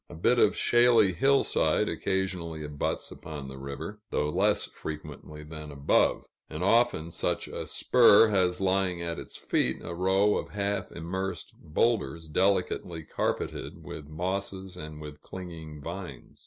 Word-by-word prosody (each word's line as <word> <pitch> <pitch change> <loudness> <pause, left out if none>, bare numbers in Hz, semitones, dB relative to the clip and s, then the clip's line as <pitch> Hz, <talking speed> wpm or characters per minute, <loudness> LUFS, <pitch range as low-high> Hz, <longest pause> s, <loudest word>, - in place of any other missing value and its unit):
A - - -9
bit 120 +9 +3
of - - +4
shaly 120 -5 +5
hillside 135 +10 +3
occasionally 90 -4 -2
abuts 75 -1 -3
upon 75 -3 -8
the 65 0 -9
river, 70 +10 -6
though 75 - 0
less - - +2
frequently 75 0 -8
than 75 0 -8
above; 70 0 +2 0.2
and 80 - -4
often 100 -6 +3
such - - -1
a - - -5
spur 115 -3 +6
has 90 -3 +2
lying 95 -2 +1
at 85 -1 -3
its - - -9
feet - - 0
a 85 - -5
row 95 +4 +3
of - - -4
half 100 -1 -1
immersed 90 0 -4
boulders, 80 - 0
delicately 90 -1 +1
carpeted - - -3
with 70 - -8
mosses 95 +3 -4
and 75 -2 -8
with 75 -1 -9
clinging 80 -5 -8
vines. 85 -7 -8
90 Hz, 140 wpm, -28 LUFS, 75-95 Hz, 0.2 s, spur